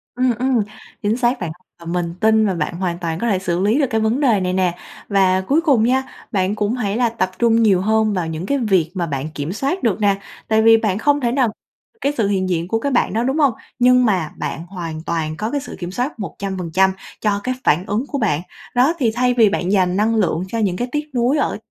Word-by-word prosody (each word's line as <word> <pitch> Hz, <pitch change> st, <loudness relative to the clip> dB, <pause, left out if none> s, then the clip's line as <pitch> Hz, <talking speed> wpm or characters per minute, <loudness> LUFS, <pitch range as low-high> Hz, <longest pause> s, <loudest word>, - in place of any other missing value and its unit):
Ừm, 250 Hz, -1 st, +1 dB
ừm, 255 Hz, -1 st, +2 dB, 0.4 s
chính 210 Hz, +3 st, +1 dB
xác 245 Hz, 0 st, +1 dB
bạn. 170 Hz, -3 st, -3 dB, 0.3 s
Và 170 Hz, -, -13 dB
mình 170 Hz, 0 st, -2 dB
tin 220 Hz, +1 st, +4 dB
là 195 Hz, -, +1 dB
bạn 170 Hz, 0 st, -2 dB
hoàn 175 Hz, -2 st, -2 dB
toàn 165 Hz, -2 st, -3 dB
có 235 Hz, -, -1 dB
thể 195 Hz, -3 st, +1 dB
xử 175 Hz, -2 st, -1 dB
lý 210 Hz, +8 st, +2 dB
được 280 Hz, -, +2 dB
cái 220 Hz, 0 st, 0 dB
vấn 220 Hz, +4 st, +1 dB
đề 240 Hz, -8 st, +3 dB
này 180 Hz, -1 st, -1 dB
nè. 180 Hz, -2 st, 0 dB, 0.3 s
Và 190 Hz, -2 st, +3 dB
cuối 285 Hz, -, +1 dB
cùng 275 Hz, -9 st, +3 dB
nha, 260 Hz, +3 st, +2 dB, 0.3 s
bạn 195 Hz, 0 st, 0 dB
cũng 210 Hz, +2 st, 0 dB
hãy 215 Hz, -3 st, -2 dB
là 245 Hz, -2 st, +2 dB
tập 190 Hz, -5 st, -2 dB
trung 230 Hz, -1 st, +4 dB
nhiều 195 Hz, -4 st, +4 dB
hơn 220 Hz, +1 st, +2 dB
vào 180 Hz, -4 st, -1 dB
những 160 Hz, +2 st, -4 dB
cái 280 Hz, +8 st, 0 dB
việc 190 Hz, -, +1 dB
mà 180 Hz, -3 st, -1 dB
bạn 140 Hz, 0 st, -3 dB
kiểm 145 Hz, +4 st, -3 dB
soát 275 Hz, -, -2 dB
được 220 Hz, -3 st, +1 dB
nè. 200 Hz, -1 st, +3 dB, 0.3 s
Tại 220 Hz, 0 st, +3 dB
vì 225 Hz, 0 st, +7 dB
bạn 215 Hz, -4 st, 0 dB
không 290 Hz, +5 st, +2 dB
thể 240 Hz, -2 st, +1 dB
nào 250 Hz, -3 st, +2 dB, 0.5 s
cái 280 Hz, -, +1 dB
sự 220 Hz, -4 st, +2 dB
hiện 190 Hz, -2 st, 0 dB
diện 170 Hz, -1 st, -1 dB
của 225 Hz, +4 st, 0 dB
cái 280 Hz, +5 st, -2 dB
bạn 245 Hz, -, +1 dB
đó, 225 Hz, +2 st, +1 dB
đúng 265 Hz, +4 st, 0 dB
hông? 280 Hz, -5 st, +3 dB, 0.3 s
Nhưng 250 Hz, 0 st, +5 dB
mà 185 Hz, -8 st, 0 dB
bạn 160 Hz, -, -4 dB
hoàn 165 Hz, -4 st, -6 dB
toàn 160 Hz, -2 st, -2 dB
có 215 Hz, +2 st, -3 dB
cái 285 Hz, -1 st, -1 dB
sự -, -, -8 dB
kiểm 175 Hz, -1 st, -5 dB
soát 245 Hz, +5 st, -3 dB
100% 190 Hz, -2 st, -1 dB, 0.3 s
cho 205 Hz, -2 st, +1 dB
cái 255 Hz, 0 st, -1 dB
phản 175 Hz, +6 st, +2 dB
ứng 215 Hz, +6 st, -1 dB
của 285 Hz, -, -3 dB
bạn. 195 Hz, -, 0 dB, 0.3 s
Đó, 255 Hz, +6 st, +4 dB
thì 235 Hz, -6 st, +1 dB
thay 250 Hz, 0 st, +2 dB
vì 225 Hz, -4 st, +5 dB
bạn 185 Hz, -2 st, -1 dB
dành 185 Hz, -2 st, +2 dB
năng 220 Hz, +2 st, +2 dB
lượng 180 Hz, -5 st, +1 dB
cho 230 Hz, -, -4 dB
những 195 Hz, -5 st, +1 dB
cái 245 Hz, -, -2 dB
tiếc 300 Hz, 0 st, -3 dB
nuối 250 Hz, +5 st, +2 dB
ở -, -, 0 dB
210 Hz, 250 wpm, -19 LUFS, 185-245 Hz, 0.5 s, vì